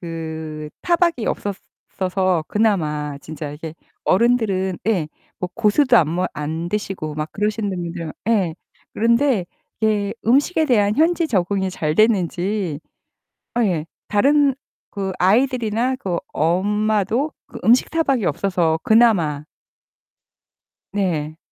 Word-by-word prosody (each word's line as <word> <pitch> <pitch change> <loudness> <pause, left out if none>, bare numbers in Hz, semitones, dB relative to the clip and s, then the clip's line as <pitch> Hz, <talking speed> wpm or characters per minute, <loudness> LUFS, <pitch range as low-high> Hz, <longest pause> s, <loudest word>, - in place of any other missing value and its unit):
그 160 -2 -6
타박이 340 -8 +1
없었어서 185 -3 -2
그나마 150 -9 0
진짜 155 -1 -7
이게 155 +2 -8 0.3
어른들은 195 -4 +2
예 175 -9 +1 0.3
뭐 180 - -2
고수도 235 +3 +4
안 160 -7 +4
뭐 180 +3 0
안 160 +3 -3
드시고 190 -6 -3
막 155 +1 -4
그러시는 210 0 -1
분들 170 -3 -5 0.2
예 190 -8 +2 0.4
그런데 235 -3 +2 0.3
이게 210 -2 +1
음식에 285 +6 +3
대한 210 -6 +2
현지 330 +1 +2
적응이 190 -1 0
잘 155 -3 -2
됐는지 190 -5 +1 0.7
아 240 0 +2
예 170 -7 0 0.2
다른 280 +6 +3 0.4
그 195 -2 -3
아이들이나 240 +3 +2
그 185 -9 -2
엄마도 210 - +1
그 245 - -10
음식 240 +3 +4
타박이 275 -8 +1
없어서 165 0 +1
그나마 185 -11 +3 1.5
네. 160 -6 -1
195 Hz, 235 characters per minute, -21 LUFS, 165-230 Hz, 1.5 s, 고수도